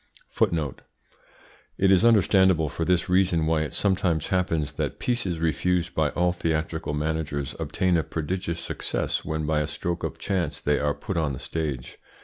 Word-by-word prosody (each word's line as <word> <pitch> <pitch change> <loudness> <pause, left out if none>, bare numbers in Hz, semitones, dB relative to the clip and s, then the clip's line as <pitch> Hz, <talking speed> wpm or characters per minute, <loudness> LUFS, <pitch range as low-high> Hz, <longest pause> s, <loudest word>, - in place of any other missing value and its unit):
It 95 0 +4
is 95 +1 +5
understandable 95 -7 +4
for 80 - -3
this 90 0 +2
reason 90 -3 +3
why 80 -1 +2
it 75 - -3
sometimes 90 -6 +1
happens 85 -5 0
that 70 - -3
pieces 115 -9 -1
refused 85 +3 0
by 80 -2 +2
all 90 +2 +1
theatrical 80 -2 -2
managers 75 -3 -2
obtain 85 +3 +1
a - - +2
prodigious 85 +1 -3
success - - -2
when 80 -1 -2
by 75 0 +1
a 75 - -1
stroke 85 +4 -3
of - - -3
chance 95 -3 -2
they 75 0 +1
are 75 0 0
put 95 -5 -4
on 80 -4 0
the 65 - -6
stage. 75 -6 -4
80 Hz, 160 wpm, -25 LUFS, 75-90 Hz, -, is